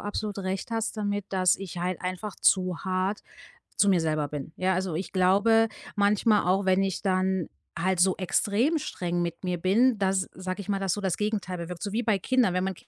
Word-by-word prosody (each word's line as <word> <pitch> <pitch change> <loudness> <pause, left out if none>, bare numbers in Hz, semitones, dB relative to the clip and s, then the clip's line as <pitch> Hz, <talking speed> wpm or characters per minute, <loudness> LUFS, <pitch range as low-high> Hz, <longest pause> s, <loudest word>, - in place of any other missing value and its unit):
absolut 205 0 -4
recht 190 +3 -3
hast 225 0 -2
damit, 205 -2 -2
dass 185 -2 +3
ich 185 -3 -7
halt 180 0 -2
einfach 185 +3 -4
zu 185 -3 +2
hart 190 +2 -1 0.6
zu 205 - +4
mir 185 -3 +4
selber 155 -2 0
bin. 145 +1 -6
Ja, 185 0 +1
also, 185 -2 -2
ich 180 +4 -4
glaube 205 +5 +4 0.3
manchmal 205 0 +3
auch, 190 +2 +2
wenn 190 0 +3
ich 195 -2 -2
dann 185 -2 0 0.3
halt 185 +2 0
so 185 0 +4
extrem 220 - +1
streng 175 -9 -3
mit 170 +2 -4
mir 180 -1 -1
bin, 220 +7 +3
dass, 190 -1 +1
sage 185 +1 -5
ich 200 - -9
mal, 200 -1 0
das 195 -2 0
so 205 - -2
das 190 -3 -1
Gegenteil 210 -3 -2
bewirkt. 170 0 -7
So 205 - -3
wie 230 +3 0
bei 215 -4 +1
Kindern, 245 -1 +2
wenn 185 0 0
man 190 0 -2
190 Hz, 210 wpm, -27 LUFS, 185-205 Hz, 0.6 s, zu